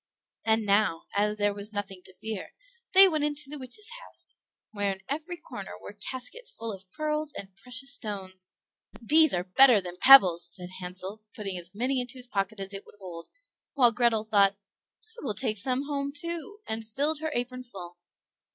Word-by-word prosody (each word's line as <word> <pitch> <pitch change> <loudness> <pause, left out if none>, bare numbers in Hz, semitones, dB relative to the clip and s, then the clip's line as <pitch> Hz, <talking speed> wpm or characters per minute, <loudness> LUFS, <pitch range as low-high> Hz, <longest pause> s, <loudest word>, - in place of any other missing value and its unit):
And 220 -1 +2
now, 200 -4 +2
as 210 +1 +1
there 205 -1 +1
was 205 +1 -4
nothing 195 -2 -4
to 185 - -12
fear, 215 0 -6 0.4
they 385 +1 +10
went 310 -5 0
into 295 -1 +1
the 300 - -6
witch's 265 - -3
house, - - -7 0.4
where 205 -2 -1
in 190 - -12
every 315 +5 -4
corner 330 - -8
were - - -10
caskets 445 - -4
full 230 0 -5
of 190 -1 -12
pearls 305 -1 -2
and 190 -1 -9
precious 255 +6 0
stones. 190 -7 -6 0.5
"These 310 +6 +5
are 175 - -1
better 230 +5 +7
than 180 -2 -8
pebbles," 190 -11 +8
said 180 -1 -8
Hansel, 185 +3 -6
putting 200 -3 -4
as 180 +1 -6
many 255 +4 0
into 245 +1 -7
his 250 - -4
pocket 205 -3 -2
as 195 +1 -5
it 195 - -6
would - - -16
hold; 175 -4 -9 0.5
while 245 -4 +6
Grethel 235 -2 +2
thought, 200 -2 +4 0.5
"I 450 +2 -14
will 210 - -2
take 215 -5 -1
some 255 +3 0
home, 280 -1 -2
too," 340 +7 -4
and 220 0 -4
filled 285 +8 0
her 315 0 -2
apron 250 +1 -3
full. 190 -8 -10
220 Hz, 185 wpm, -28 LUFS, 195-280 Hz, 0.5 s, they